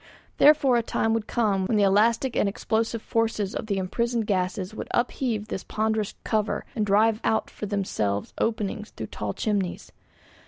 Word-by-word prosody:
Therefore 285 -4 +6
a - - +3
time 225 -1 0
would 225 -1 -1
come 200 -5 +1
when 220 - +1
the 205 - +4
elastic 225 +6 +3
and 200 - +2
explosive 225 +2 -1
forces 225 -3 0
of 220 - -4
the 200 -2 0
imprisoned 235 +5 -1
gases 185 0 -1
would - - -6
upheave 240 -3 -1
this 190 - -4
ponderous 220 -1 -1
cover 215 -2 -1
and 215 -3 0
drive 215 +2 +3
out 220 - 0
for 210 - -6
themselves 105 - -2
openings 215 -1 -1
through 110 - -7
tall 105 -1 -3
chimneys. 200 -4 -2
215 Hz, 165 wpm, -26 LUFS, 200-230 Hz, -, Therefore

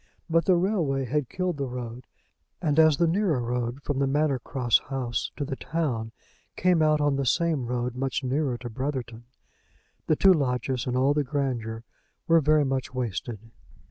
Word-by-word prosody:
But 165 -1 +3
the 185 - +5
railway 170 -8 0
had 135 +1 -1
killed 185 -3 -2
the 140 -1 -2
road; 125 0 -7 0.5
and 155 -3 +1
as 155 -2 +6
the 170 - +3
nearer 170 -4 +1
road 120 +2 -3
from 145 -2 -2
the 140 - +2
Manor 145 -1 +1
Cross 120 -2 +1
House 130 -3 -2
to 145 - -2
the 135 - -4
town 130 -9 -2 0.4
came 180 -2 +3
out 155 -1 +3
on 145 -2 +2
the 140 - 0
same 155 -4 +1
road 125 0 -2
much 135 +1 -2
nearer 130 -1 0
to 120 0 -7
Brotherton, 120 -2 -4 0.8
the 155 - +3
two 190 +4 +6
lodges 130 -4 -1
and 125 0 0
all 135 +3 +3
the 150 0 +1
grandeur 125 -5 -3 0.4
were 165 -1 +5
very 150 0 +3
much 130 -1 -2
wasted. 115 -2 -3
135 Hz, 175 wpm, -26 LUFS, 125-155 Hz, 0.8 s, as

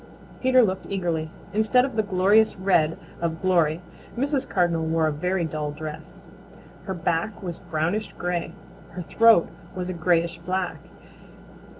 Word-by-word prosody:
Peter 255 -1 +5
looked 190 -3 -1
eagerly. 170 -5 -2 0.2
Instead 220 +4 +3
of 265 -4 -6
the 220 - +3
glorious 205 +2 +3
red 175 -5 +2 0.2
of 165 -1 -2
Glory, 170 -3 +2 0.3
Mrs. 275 +1 0
Cardinal 175 -3 +1
wore 160 0 +1
a 155 - +2
very 180 +4 -1
dull 155 -2 -3
dress. 155 +2 -8 0.6
Her 190 - -3
back 170 +5 -2
was 175 -3 -5
a - - -20
brownish 170 +7 -1
gray. 175 -1 -3 0.4
Her 180 +1 -5
throat 225 0 +5 0.3
was 180 0 -4
a - - -2
grayish 170 0 +1
black. 180 +1 -2
180 Hz, 145 wpm, -25 LUFS, 165-195 Hz, 0.6 s, Peter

